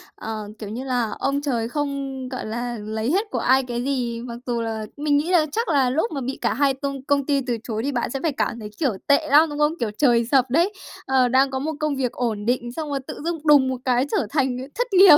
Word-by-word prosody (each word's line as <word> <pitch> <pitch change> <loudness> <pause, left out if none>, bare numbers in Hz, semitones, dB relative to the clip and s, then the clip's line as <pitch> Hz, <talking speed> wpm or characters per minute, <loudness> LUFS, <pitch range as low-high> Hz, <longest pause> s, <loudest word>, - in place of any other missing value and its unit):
Ờ, 215 -2 -5
kiểu 210 - -6
như 235 +5 -5
là 245 -4 0
ông 275 +1 0
trời 240 -6 -1
không, 275 -2 -3
gọi 255 -4 -5
là, 240 +2 -3
lấy 220 +3 -2
hết 410 +5 +1
của - - -1
ai 265 +1 +4
cái 240 -1 -3
gì. 245 -4 -1
Mặc 235 -1 -6
dù 240 -2 -1
là 220 -1 -3
mình 290 0 +2
nghĩ 310 +5 0
là 330 -4 +5
chắc 460 +4 -1
là 275 -5 +3
lúc 320 - 0
mà 275 -3 -3
bị 265 +2 -3
cả 235 - +1
hai 275 +2 +2
tông 275 0 -4
công 280 0 +1
ty 280 -1 +2
từ 240 -2 0
chối 220 -1 -3
thì 280 - 0
bạn 245 -3 -1
sẽ 270 - -3
phải 320 - +2
cảm 235 -3 -2
thấy, 210 - -7
kiểu, 285 -6 +2 0.2
tệ 290 +2 +4
lắm, 305 +3 +6
đúng 295 0 -5
không? 300 +2 +3
Kiểu 225 -3 -1
trời 240 -5 +4
sập 265 -2 +4
đấy. 340 +10 +2 0.3
Ờ, 260 -1 +3
đang 265 +2 +3
có 265 - -2
một 310 +3 -2
công 305 -2 0
việc 255 -3 -1
ổn 220 -4 -2
định, 240 0 0
xong 305 +3 -5
rồi 280 -1 -1
tự - - -7
dưng 335 0 -1
đùng 285 -3 +7
một 260 - -1
cái 250 0 +3
trở - - +1
thành, 265 -3 +1
ờ, 260 +1 -6
thất - - 0
nghiệp. 365 -5 +9
265 Hz, 270 wpm, -23 LUFS, 240-290 Hz, 0.3 s, nghiệp